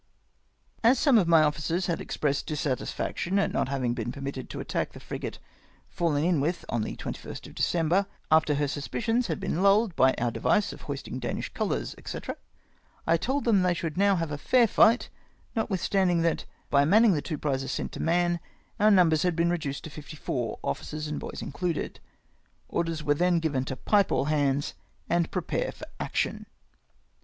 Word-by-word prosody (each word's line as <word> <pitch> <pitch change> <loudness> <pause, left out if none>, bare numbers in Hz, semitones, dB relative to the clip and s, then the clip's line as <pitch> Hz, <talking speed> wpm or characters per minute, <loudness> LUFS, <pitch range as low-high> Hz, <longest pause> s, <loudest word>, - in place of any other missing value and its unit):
As 240 +4 +6
some 270 -7 +5
of 180 - +1
my 165 -2 +6
officers 155 +4 0
had 170 - -1
expressed 140 -2 -1
dissatisfaction 150 +5 -2
at 200 - +1
not - - 0
having 130 -3 0
been 120 -1 -3
permitted 135 -1 -6
to - - -6
attack - - -2
the - - -10
frigate - - -6 0.5
fallen 155 -4 0
in 170 -4 +2
with 170 +5 -1
on 115 - 0
the - - -3
21st - - -7
of - - -11
December, 175 +4 +1 0.2
after 155 -1 +4
her 145 0 +1
sus 145 0 -4
picions 235 +2 0
had - - -2
been 190 -4 -2
luUed 200 0 +4
by 130 0 +4
our 120 -1 0
device 210 - +1
of - - -12
hoisting 140 -2 -5
Danish 120 - -4
colours, - - -2
&c., - - -5 0.9
I 165 - +4
told 265 - -1
them 215 -5 +4
they 180 -1 +2
should 165 -3 -3
now 200 +1 +4
have 165 -3 -2
a 145 - -4
fair 245 - +4
fight, 230 +3 +4 0.5
notwithstanding 190 -5 +1
that, 165 -1 0 0.3
by 140 0 +5
manning 210 +7 +5
the 150 - 0
two 155 -1 -4
prizes 135 -2 -2
sent - - -3
to - - -8
Mahon, 175 +1 +2 0.4
our 210 +1 +6
numbers 170 -6 +5
had 180 -2 +1
been 170 +1 +2
reduced 155 -5 -3
to 160 - -8
fifty 150 +1 -10
fom", 120 -5 -2
officers 150 - -3
and 150 - -3
boys - - -6
included. 170 +2 -3 0.7
Orders 165 -2 -1
were 145 - +3
then 175 +3 +2
given 145 -5 -1
to 130 - -4
pipe 200 +8 +2
all - - +2
hands, 145 -2 +1 0.3
and 170 -1 +1
prepare 185 - -2
for - - -10
action. - - -2
165 Hz, 185 wpm, -27 LUFS, 145-185 Hz, 0.9 s, As